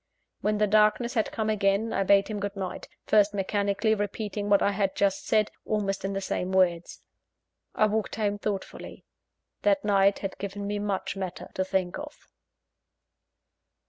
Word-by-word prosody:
When 210 0 0
the 210 - +3
darkness 215 +3 +3
had 220 -4 0
come 220 -2 -2
again, 205 +1 +1
I - - +1
bade 195 +1 +4
him 215 -2 -4
good 200 0 -4
night 190 -2 -5 0.2
first 205 -1 +3
mechanically 200 +2 +1
repeating 205 0 -3
what 200 -1 +4
I 200 - +3
had 195 -1 -1
just 195 -1 0
said, 215 -1 +2
almost 200 -3 -1
in 195 0 -2
the 195 - -2
same 185 -1 -2
words. 175 -3 +1 0.7
I 215 - +4
walked 215 0 -1
home 205 -2 -1
thoughtful. 200 -2 -4 0.8
That 295 -4 +2
night 200 -1 +4
had 195 -1 -6
given 200 +1 -5
me 205 0 -2
much 205 -2 -2
matter 190 -2 -6
to 185 - 0
think 190 -1 -1
of. 295 - -8
200 Hz, 165 wpm, -27 LUFS, 195-215 Hz, 0.8 s, bade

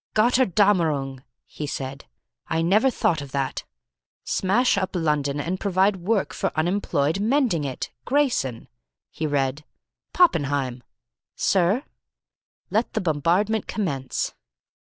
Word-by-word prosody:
"Gotterdammerung!" 190 - +2 0.2
he 150 - -6
said. 135 0 -5 0.4
"I 160 0 0
never 210 +10 +4
thought 170 - 0
of 140 -2 -9
that. 140 -1 -2 0.6
'Smash 220 +7 +2
up 190 -1 -2
London 150 -4 0
and 175 +5 -2
provide 195 +1 +2
work 195 +3 0
for - - -1
unemployed 160 -2 +1
mending 220 - +1
it. 130 -2 -4
GRAYSON,'" 245 - 0 0.4
he 155 - -3
read. 140 0 -1 0.5
"Poppenheim." 145 - +2 0.5
"Sir?" 195 +7 +2 0.9
"Let 220 +5 0
the 220 - 0
bombardment 180 +7 +1
commence." 140 - -2
170 Hz, 110 wpm, -24 LUFS, 145-210 Hz, 0.9 s, never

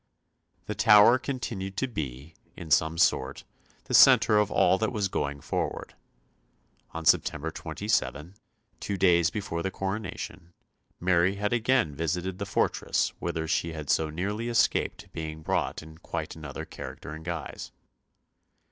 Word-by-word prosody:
The 105 - -3
Tower 105 +4 +6
continued 100 -8 -5
to 130 - 0
be, 75 - -6 0.2
in 80 -2 -9
some 80 +2 +3
sort, 65 -4 +1 0.4
the - - -7
centre 105 -1 +7
of 105 -1 +1
all 95 - +3
that 110 +2 0
was 105 -5 0
going 70 -4 -3
forward. - - -3 1.0
On 80 -1 -6
September 75 +1 +2
27, 75 +3 -2 0.5
two 100 - -3
days 85 -3 +4
before 95 -5 -4
the 95 - -1
coronation, 95 -3 -5 0.5
Mary 90 +1 +2
had 105 +2 -1
again 120 - +2
visited 90 +4 -2
the 100 - -4
fortress - - 0
whither 80 -2 -3
she 80 +1 -1
had 75 -3 -3
so 80 -1 +1
nearly 105 +8 -3
escaped 115 -2 +1
being 80 -1 -6
brought - - -1
in 80 0 -14
quite - - -5
another 75 -4 -7
character 75 - -8
and 80 +1 -9
guise. 85 -3 -6
85 Hz, 140 wpm, -27 LUFS, 80-105 Hz, 1.0 s, centre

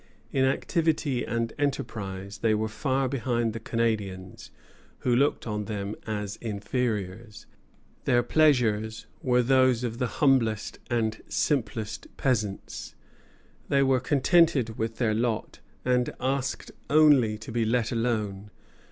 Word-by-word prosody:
In 130 -1 +2
activity 150 -1 0
and 115 -1 -2
enterprise 100 -8 -3
they 110 -1 +2
were 110 +1 0
far 130 +4 0
behind 120 -3 -1
the 115 - -5
Canadians, 105 -5 -2 0.5
who 125 -1 +2
looked 140 +4 +2
on 105 -2 -3
them 100 -1 -4
as 105 -2 -3
inferiors. 105 -1 -3 0.6
Their 120 0 +3
pleasures 115 -7 +2 0.2
were 125 -4 +3
those 130 -1 +3
of 120 -1 -3
the 125 - +1
humblest 120 -7 +2
and 110 -2 0
simplest 110 -6 -1
peasants; 110 -7 -2 0.7
they 140 0 +4
were 130 -1 +3
contented 135 -3 +3
with 110 0 -2
their 115 -4 +1
lot, 115 0 -1 0.3
and 125 -1 +2
asked 130 -1 -2 0.2
only 145 -8 +5
to 110 - -9
be 115 0 +1
let 115 0 +1
alone. 110 -4 -1
115 Hz, 125 wpm, -27 LUFS, 110-130 Hz, 0.7 s, only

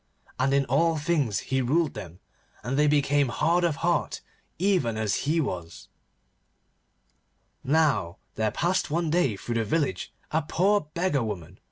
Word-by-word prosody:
And 130 +1 +2
in 140 0 +2
all 160 +6 +2
things 150 - 0
he 130 - +3
ruled 150 +5 +1
them, 90 -4 -9 0.4
and 125 +4 -2
they 150 +1 +3
became 145 -2 +2
hard 170 +7 +1
of 170 -4 +1
heart 175 -3 0 0.4
even 175 - +1
as 110 +4 -1
he 165 +2 +2
was. 90 - -5 1.7
Now 135 - +1 0.2
there 110 0 0
passed 180 - 0
one 165 +1 -1
day 145 - +1
through 120 - -5
the - - 0
village 110 - -1 0.2
a 160 - +1
poor 200 +7 +2
beggar 170 -6 +1
woman. 95 -4 -6
145 Hz, 150 wpm, -26 LUFS, 110-165 Hz, 1.7 s, he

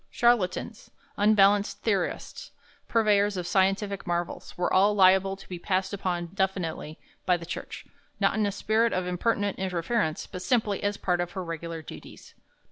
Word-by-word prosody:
Charlatans, 225 -2 0 0.3
unbalanced 205 -1 +3
theorists, 200 -5 -2 0.4
purveyors 205 -3 +2
of 180 - -3
scientific 195 +2 0
marvels, 175 +1 -3
were 175 - 0
all 200 +2 +4
liable 190 0 +5
to 195 - -14
be 180 -2 -6
passed 190 +2 -1
upon 175 -3 -3
definitely 185 -5 -2 0.3
by 180 -1 +4
the 170 - -9
Church, 170 - -7 0.3
not - - +3
in 215 -2 +1
a - - -1
spirit 220 +3 +1
of 185 -1 -1
impertinent 200 +3 -1
interference, 185 -1 -1
but 180 - -8
simply 215 -2 0
as 205 0 -1
part 175 -1 0
of 175 0 -4
her 190 - -4
regular 165 -1 -6
duties. - - -12
190 Hz, 155 wpm, -27 LUFS, 180-205 Hz, 0.4 s, liable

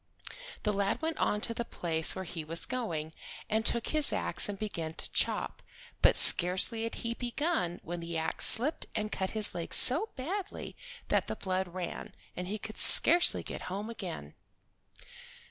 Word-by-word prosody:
The 210 - -1
lad 200 0 -1
went 320 0 -3
on 210 - -1
to 230 - -1
the 235 - -4
place 165 -7 -2
where 190 0 -6
he 165 -2 -7
was 165 +2 -1
going, 165 -12 -5 0.4
and 220 +1 0
took 235 0 -2
his 305 -2 +2
ax - - -3
and 200 - -5
began 165 -6 -6
to - - -7
chop, - - -2 0.4
but - - +4
scarcely 190 +6 +5
had 230 - -6
he 230 - -2
begun 245 - -3
when 175 +1 -6
the 170 0 -6
ax 160 0 -1
slipped 275 +8 0
and 215 0 -3
cut 190 -1 -3
his 210 -1 0
leg 170 -1 -2
so 320 - +5
badly 370 +9 -6 0.3
that - - 0
the - - -5
blood 185 0 -3
ran, 180 0 -8 0.2
and 180 0 -6
he 210 +3 -4
could 215 +1 -8
scarcely 345 +2 +8
get - - -8
home 205 +5 -6
again. 170 - -8
205 Hz, 175 wpm, -29 LUFS, 175-235 Hz, 0.4 s, scarcely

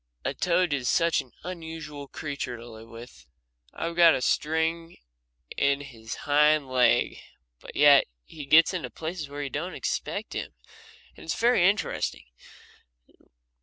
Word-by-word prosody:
A 135 - -1
toad 175 +1 +1
is 130 -3 -1
such 170 -1 +2
an 125 - -18
unusual 160 -4 -7
creature 140 -4 -5
to 115 +1 -11
live 115 0 -12
with. 115 - -13 0.4
I've 170 0 -4
got 170 -2 +7
a - - -3
string 160 +3 -1 0.6
to 140 0 +1
his 115 -5 -8
hind 150 0 +4
leg, 125 -2 +2 0.4
but - - -12
yet 145 -1 +6 0.2
he 150 -3 -10
gets 160 +5 +6
into 180 - -4
places 160 -2 -6
where 145 +1 -5
you 140 - -5
don't 175 +5 -4
expect - - -3
him, - - -5 0.6
and - - -13
it's - - -3
very 230 -6 +4
interesting. 205 - -2
150 Hz, 145 wpm, -26 LUFS, 135-165 Hz, 0.6 s, got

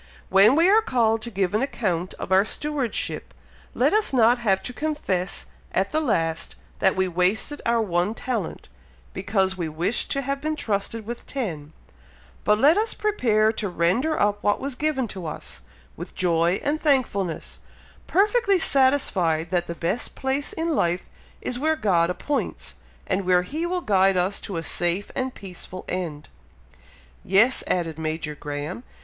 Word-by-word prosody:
When 200 +6 +6
we 335 +3 +5
are 425 +3 +6
called 225 - +1
to 235 - -2
give 195 -4 -1
an 215 - +2
account 210 -10 -2
of - - -7
our 190 +1 +6
stewardship, 280 0 -1 0.4
let - - +3
us 430 0 +2
not 240 -1 +4
have 195 -5 +1
to 250 - -5
confess 245 -12 -2 0.3
at 190 +1 0
the 310 - +1
last 165 - -1 0.2
that - - +3
we 190 0 +1
wasted 185 - 0
our 235 0 +3
one 180 +2 0
talent, 230 -10 -4 0.5
because 190 -2 0
we 170 -3 -2
wished 170 +9 -1
to 275 0 -1
have 275 +1 -2
been 310 +1 -1
trusted 215 -3 -2
with 235 +2 -7
ten; 165 - -4 0.7
but 210 - +4
let 290 - +5
us 445 +1 -1
prepare 225 - +2
to 215 -2 -3
render 185 - +1
up 205 0 +2
what 205 - +1
was 275 0 -3
given 265 -2 -1
to 185 -4 -6
us, 155 - -7 0.3
with - - -8
joy 170 0 +2
and 295 +2 -1
thankfulness, 210 - 0 0.5
perfectly 410 +1 +3
satisfied 195 - +2
that 175 -1 0
the 170 - -4
best 175 +8 -2
place 270 +2 -1
in 325 +1 -2
life 175 - 0 0.3
is 245 - -2
where 315 +3 +2
God 175 - +2
appoints, 285 +10 -3 0.3
and 190 +1 0
where 180 -1 +3
He 315 - -3
will 360 0 -1
guide 195 - +3
us 185 +3 +1
to 190 - -5
a 165 - -3
safe 175 +4 0
and 260 -1 -3
peaceful 185 -1 -8
end." 165 -5 -4 1.0
"Yes!" 220 +7 +3
added 165 -3 -1
Major 155 -1 -3
Graham. 150 - -5
205 Hz, 165 wpm, -24 LUFS, 180-270 Hz, 1.0 s, When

